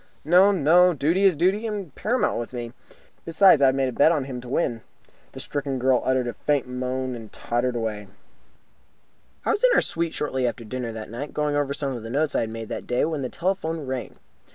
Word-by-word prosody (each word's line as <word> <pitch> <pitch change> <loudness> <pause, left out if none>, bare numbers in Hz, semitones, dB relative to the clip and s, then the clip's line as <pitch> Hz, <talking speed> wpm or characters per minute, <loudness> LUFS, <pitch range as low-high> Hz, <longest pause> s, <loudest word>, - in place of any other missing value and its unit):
"No, 180 +5 +6
no. 180 +1 +4
Duty 165 +8 +1
is 190 -4 +5
duty, 190 +8 +1
and 200 -9 -5
paramount 240 - 0
with 120 +1 -6
me. 120 -1 -6 0.5
Besides, 165 -2 +5
I 135 - +6
have 130 +1 +2
a 135 -1 +1
bet 145 +6 +4
on 150 -5 0
him 130 -2 -6
to 125 - -10
win." 120 -4 -1 0.5
The - - -8
stricken 140 -2 -3
girl 130 0 +2
uttered 130 -1 +1
a 120 - -3
faint 145 -3 0
moan, 130 0 -3
and 115 -3 -9
tottered 120 +1 -2
away. 110 -3 -3 1.4
I - - +2
was 420 - -1
in - - +7
our - - +5
suite 165 -1 -2
shortly 130 -4 -1
after 120 0 -4
dinner 125 +1 -4
that 110 -1 -8
night, 135 +5 -6
going 150 -1 0
over 145 -1 0
some 135 -3 -2
of 120 - -6
the 115 - -8
notes 145 +5 0
I - - +1
had 115 - -2
made 115 -1 -7
that - - -6
day, 125 - +1
when 155 -2 -2
the 130 - -3
telephone 165 -3 -2
rang. 130 -1 -5
135 Hz, 220 wpm, -24 LUFS, 125-165 Hz, 1.4 s, in